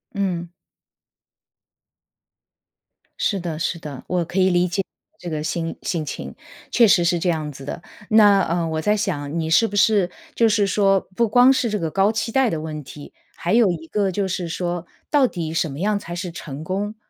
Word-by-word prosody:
嗯。 180 -4 -1 2.7
是 200 - 0
的， 170 -3 -4
是 170 0 -2
的。 145 -4 -8
我 180 -2 0
可 180 +4 -3
以 190 0 +4
理 175 0 +2
解 190 +3 -1 0.4
这 175 - -6
个 155 -2 -3
心 165 +1 -3
心 165 -4 -2
情。 140 - -6 0.4
确 235 - +5
实 180 -3 +4
是 170 +1 +2
这 175 - 0
样 155 -3 -1
子 140 -1 -11
的， 145 - -6 0.3
那， 205 -2 +6
呃， 170 -1 0
我 160 0 -2
在 210 +5 +2
想 170 -7 -2
你 160 -1 -2
是 225 +8 +4
不 205 - -7
是 200 -2 +3 0.3
就 230 -1 +4
是 205 -1 +2
说 195 -1 +3
不 235 +2 +2
光 245 +4 +6
是 245 -3 0
这 210 -1 -1
个 165 - -2
高 195 +5 +2
期 225 +1 -2
待 265 0 +3
的 165 - -2
问 155 -1 -6
题， 145 +2 -11 0.2
还 175 - -2
有 225 -5 +5
一 160 -2 -6
个 200 +1 0
就 195 +1 -1
是 180 -1 -3
说 175 0 -3 0.2
到 285 -3 +4
底 165 -7 -4
什 165 -2 0
么 135 - -7
样 205 +3 +1
才 175 -4 -7
是 175 0 -4
成 150 -3 -7
功， 200 +5 -3
180 Hz, 215 characters per minute, -22 LUFS, 165-205 Hz, 2.7 s, 那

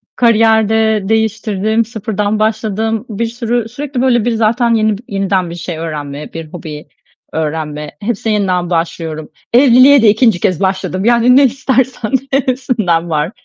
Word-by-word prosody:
kariyer 220 -2 +3
de 220 -1 +2
değiştirdim, 220 0 0
sıfırdan 215 -1 -3
başladım. 220 +1 -1
Bir 220 +2 -2
sürü, 235 0 -2
sürekli 270 0 -4
böyle, 240 -4 +2
bir, 240 - +1
zaten 230 +2 +1
yeni 215 -2 +1
b - - -14
yeniden 195 -3 -1
bir 170 - -7
şey 170 -1 -6
öğrenme, 150 -3 -6
bir 165 -1 -6
hobi 155 -3 -8 0.4
öğrenme, 150 -1 -4
hepsine 220 0 -2
yeniden 180 -4 0
başlıyorum. 165 -2 -3 0.2
Evliliğe 260 +1 +6
de 220 - +5
2'nci 220 -3 +3
kez 180 -3 0
başladım, 190 0 -1
yani, 240 +1 +4
ne 280 - +6
istersen 260 -2 -1 0.2
hepsinden 245 -11 0
var. 155 +3 -1
215 Hz, 145 wpm, -14 LUFS, 180-235 Hz, 0.4 s, Evliliğe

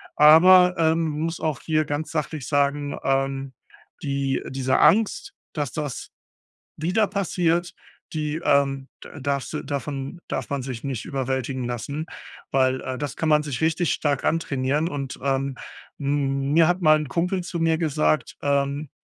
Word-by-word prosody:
Aber, 180 +4 +7
ähm, 160 0 +2
muss 160 +2 -3
auch 155 -5 -1
hier 155 -1 +1
ganz 145 +2 -3
sachlich 155 -3 -3
sagen, 145 0 0
ähm, 135 0 -1 0.5
die 140 -2 -1
diese 130 -1 0
Angst, 220 - +3 0.2
dass 145 -4 -3
das 150 -4 -4 0.7
wieder 185 +7 +1
passiert, 175 -3 0 0.4
die, 155 0 -2
ähm, 135 -1 +2 0.2
d - - -11
darfst 140 0 -2
du - - -2
davon, 140 +2 -4
darf - - -4
man 140 -2 -2
sich 125 -3 -6
nicht 135 -5 -3
überwältigen 130 -1 -2
lassen, 140 +6 -4 0.5
weil, 130 -1 +2
äh, 130 -1 -4
das 145 -3 -4
kann 160 - -1
man 150 0 +5
sich 140 -3 -4
richtig 160 +1 +1
stark 145 -3 -1
antrainieren 145 -1 0
und, 140 -4 -5
ähm, 135 0 -1 0.4
m 140 -1 0
mir 165 -1 +6
hat 180 +1 +1
mal 155 -1 +6
'n 150 - -3
Kumpel 180 +3 -1
zu 170 -1 -4
mir 165 -1 +2
gesagt, 155 -4 0
ähm: 140 +1 0
145 Hz, 155 wpm, -24 LUFS, 135-160 Hz, 0.7 s, Aber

